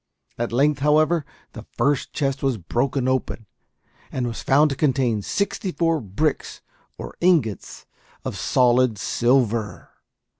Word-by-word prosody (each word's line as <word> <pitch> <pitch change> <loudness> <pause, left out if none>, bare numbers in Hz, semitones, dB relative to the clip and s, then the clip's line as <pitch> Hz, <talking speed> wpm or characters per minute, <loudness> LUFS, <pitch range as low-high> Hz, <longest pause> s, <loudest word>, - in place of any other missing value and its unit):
At 120 - -2
length, 145 +4 +2
however, 155 +2 +2 0.3
the - - -8 0.2
first 140 -1 0
chest 135 -2 -2
was 135 -4 0
broken 125 - -1
open, 130 -3 -2 0.7
and 125 - -2
was 115 -1 -5
found 145 +2 +3
to - - -2
contain 130 -7 +1
sixty 200 - -2
four 165 -3 0
bricks 120 +9 -2 0.4
or - - -8
ingots 155 - 0 0.4
of - - -4
solid 125 -2 +2
silver! 115 -1 0
135 Hz, 125 wpm, -22 LUFS, 120-150 Hz, 0.7 s, found